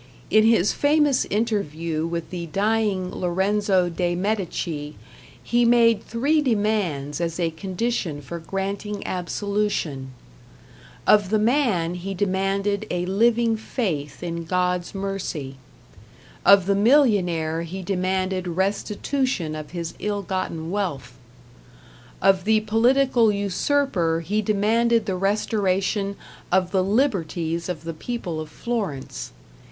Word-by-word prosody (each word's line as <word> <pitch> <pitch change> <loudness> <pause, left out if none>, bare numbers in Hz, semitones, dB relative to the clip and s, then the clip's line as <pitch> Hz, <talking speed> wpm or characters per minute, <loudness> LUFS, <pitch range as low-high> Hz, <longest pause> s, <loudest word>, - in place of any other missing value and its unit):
In 215 +1 +5
his 220 -4 +4
famous 290 -2 +3
interview 170 -7 -1
with 170 -1 -4
the 175 -2 -5
dying 200 0 0
Lorenzo 190 +1 +1
de 175 0 -1
Medici 175 -6 -2 0.5
he 240 0 +2
made 230 -2 +4
three 285 +7 +1
demands 205 - 0
as 170 0 -2
a 165 -2 +1
condition 185 -2 -2
for 170 +4 -7
granting 195 +3 -4
absolution. 185 -6 -2 1.0
Of 205 -3 +5
the 215 - +3
man 215 - +2
he 190 +2 -5
demanded 195 +1 0
a 180 0 -1
living 225 +4 +2
faith 175 - -3
in 170 -1 -4
God's 180 +1 -1
mercy. 190 -9 -4 0.9
Of 200 -2 +7
the 200 - +2
millionaire 195 - +3
he 180 +3 -6
demanded 185 0 -1
restitution 200 - -1
of 155 -1 -6
his 170 -2 -5
ill 205 -1 -2
gotten 170 -3 -3
wealth. 155 -12 -3 1.1
Of 190 -1 +4
the 220 0 +3
political 235 +2 +3
usurper 200 - 0
he 205 +6 -1
demanded 220 +2 +2
the 195 -3 -1
restoration 200 0 0 0.4
of 180 0 +2
the 190 -2 +2
liberties 180 - 0
of 160 -4 -4
the 165 0 -4
people 175 -2 -4
of 155 -1 -6
Florence. 195 - -4
195 Hz, 115 wpm, -23 LUFS, 170-215 Hz, 1.1 s, Of